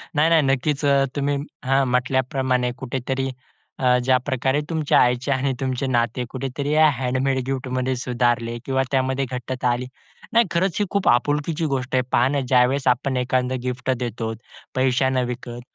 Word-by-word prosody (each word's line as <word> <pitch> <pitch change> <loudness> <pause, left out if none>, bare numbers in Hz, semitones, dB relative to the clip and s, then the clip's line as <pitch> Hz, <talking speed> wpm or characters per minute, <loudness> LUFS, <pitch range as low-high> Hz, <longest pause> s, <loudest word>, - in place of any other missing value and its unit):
नाही, 155 +3 +4
नाही, 160 -2 +6
नक्कीच. 135 +2 0
अ, 140 -1 +4
तुम्ही 140 0 0 0.3
हां. 135 +1 +3
म्हटल्याप्रमाणे 125 0 0
कुठेतरी 135 +1 -3 0.5
अ, 125 -1 +4
ज्याप्रकारे 130 +2 +1
तुमच्या 160 -3 +2
आईचे 125 +3 +2
आणि 135 +1 +1
तुमचे 130 0 -2
नाते 120 0 0
कुठेतरी 135 +2 -4
या 155 0 +6
हँडमेड 130 +1 -1
गिफ्टमध्ये 130 -1 -2
सुधारले 120 -1 0
किंवा 135 0 +1
त्यामध्ये 130 0 +1
घट्टता 125 0 -3
आली. 120 +1 -1 0.5
नाही, 235 0 +5
खरंच 170 0 +1
ही 205 - +2
खूप 200 -3 0
आपुलकीची 145 +6 +1
गोष्ट 130 0 -3
आहे. 130 - +4
पहा 120 +2 +4
ना 140 0 0
ज्यावेळेस 130 +2 +3
आपण 130 +1 +1
एखांद 125 0 0
गिफ्ट 125 +1 -3
देतो, 115 -2 -3 0.4
पैशानं 130 0 +2
विकत. 120 -1 -6
130 Hz, 150 wpm, -22 LUFS, 125-140 Hz, 0.5 s, नाही